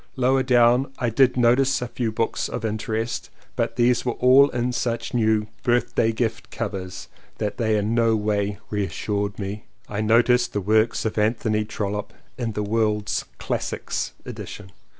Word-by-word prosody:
Lower 130 0 +3
down 125 +1 +4
I 120 -3 -1
did 125 +2 +3
notice 125 +3 +3
a 125 - -3
few 120 -2 -2
books 115 +1 -1
of - - -4
interest 110 +1 -3 0.3
but - - -1
these 120 +1 +3
were 120 - -1
all 130 +4 +6
in 120 -1 -1
such 115 -1 -2
new 110 -2 +2 0.2
"birthday 120 -1 +2
gift" 115 +1 -2
covers 95 -5 -5 0.3
that 105 -1 -3
they 110 -3 +1
in 105 +2 0
no 115 -1 +3
way 105 -1 -1
reassured 100 0 -2
me. 100 +1 -5 0.2
I 105 0 -3
noticed 120 +2 +3
the 105 - 0
works 110 +4 +2
of 110 0 -1
Anthony 110 0 +1
Trollope 105 -1 -4 0.2
in 120 -3 -3
the 105 - -2
World's 105 0 0
Classics - - -3
edition. 95 -2 -8
115 Hz, 155 wpm, -23 LUFS, 105-120 Hz, 0.3 s, all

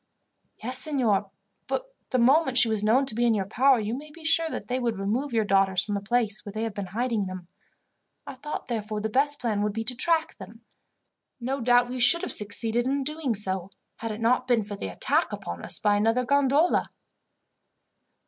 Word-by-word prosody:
"Yes, 255 +3 +2
signor; 235 -9 +1 0.4
but - - -4 0.2
the 255 - 0
moment 265 +2 +3
she 240 - +6
was 220 -2 -1
known 240 +6 +3
to 260 - -2
be 235 +2 0
in 235 -2 +3
your 195 -2 -1
power, 260 +5 +3
you 215 +1 -3
may 290 +4 -7
be 315 +1 -14
sure 325 0 +3
that - - -6
they 255 +1 -1
would 235 -4 -1
remove 230 +9 -2
your 225 -2 +1
daughters 195 -1 +2
from 205 - -4
the 200 - -2
place 220 0 -1
where 205 - -8
they 215 +2 -4
have 225 -2 -3
been 200 -2 -5
hiding 225 0 -1
them. 185 -2 -8 0.8
I - - -7
thought, 290 +4 -6
therefore, 215 -3 -3
the 220 +1 -2
best 285 +4 +2
plan 220 -5 -1
would 210 0 -1
be 225 +1 -3
to 245 +3 0
track 325 +5 +1
them. 210 +4 -12 0.8
No 260 +2 -3
doubt 245 +1 +4
we 255 +1 -5
should 340 +8 +5
have - - -3
succeeded 225 +3 -1
in 275 +1 0
doing 300 -4 -2
so, 190 -2 -3 0.3
had 225 - -5
it 215 +1 -6
not 250 +2 +2
been 240 -3 +2
for 205 0 -7
the 200 - -5
attack 90 - 0
upon 85 0 -6
us - - +1
by 205 -1 +2
another 225 +4 +1
gondola." 280 +5 +2
235 Hz, 210 wpm, -26 LUFS, 210-265 Hz, 0.8 s, she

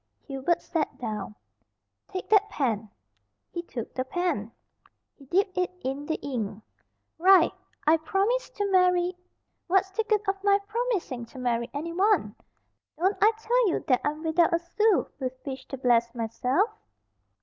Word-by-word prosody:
Hubert 275 +4 -1
sat 320 -4 -2
down. 210 -3 -5 0.7
"Take 375 -1 -5
that 420 -1 +5
pen." 225 - -1 0.6
He 345 - -3
took 240 -9 -7
the 255 - -1
pen. 260 - -2 0.6
He 275 - -17
dipped 370 +5 +1
it 365 - +1
in 275 +3 -3
the 315 - 0
ink. 220 -6 -4 0.6
"Write, 370 -1 +6 0.3
'I 315 +2 +6
promise 395 +10 0
to 410 - -3
marry 360 -1 +3 0.2
'" - - -51
"What's 380 +1 +2
the 445 +4 0
good 430 -2 +1
of 390 0 -1
my 400 -1 +5
promising 410 - -2
to 245 - -14
marry 240 -1 -1
anyone? 335 - +1 0.6
Don't 380 +5 +2
I 430 - +7
tell 470 0 +2
you - - -2
that 255 - +4
I'm 300 +2 -2
without 330 +2 +3
a - - +4
sou 390 +5 +2
with 255 -2 -2
which 265 -2 -6
to 270 - -6
bless 235 -2 +2
myself?" 250 - 0
335 Hz, 155 wpm, -27 LUFS, 255-390 Hz, 0.7 s, I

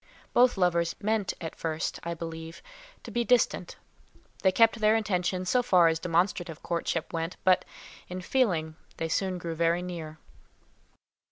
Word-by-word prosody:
Both 245 -2 +5
lovers 170 -2 +1
meant 215 -2 0
at 165 -2 -6
first, 160 0 -3
I 170 0 -4
believe, 165 0 -7 0.4
to - - -9
be 240 - 0
distant; 245 0 +1 0.7
they 190 - +4
kept 225 +4 +4
their 215 0 +4
intention 185 -4 0
so 250 +7 +3
far 180 -8 +5
as 160 0 -1
demonstrative 175 -1 -1
courtship 170 -1 -2
went, 165 +2 -3
but 185 -1 +4 0.4
in 180 +1 -5
feeling 175 -10 0 0.2
they 165 - -2
soon 185 +2 0
drew 170 -1 -4
very 170 +2 +1
near. 165 -3 -6
180 Hz, 150 wpm, -28 LUFS, 165-195 Hz, 0.7 s, Both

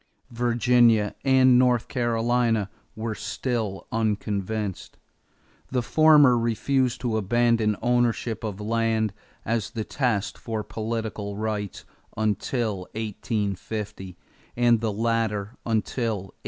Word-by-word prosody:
Virginia 120 -2 +3
and 130 -2 +5
North 125 -2 +3
Carolina 115 -3 +1 0.2
were 110 0 -3
still 110 -1 -3
unconvinced. 105 -2 -2 0.7
The 125 -2 0
former 145 -3 +6
refused 125 +2 0
to 120 -3 0
abandon 115 0 +2
ownership 120 -2 +1
of 105 -3 -4
land 110 -1 0 0.3
as 110 -4 -1
the 110 - -4
test 110 -5 -1
for 110 -2 -4
political 110 -2 -4
rights 105 -2 -3 0.3
until 110 -2 -1
1850 105 -3 -4 0.4
and 120 -2 +4
the 110 -2 0
latter 110 -1 -1
until 115 +1 0 0.2
1856. - - -42
115 Hz, 100 wpm, -25 LUFS, 105-120 Hz, 0.7 s, former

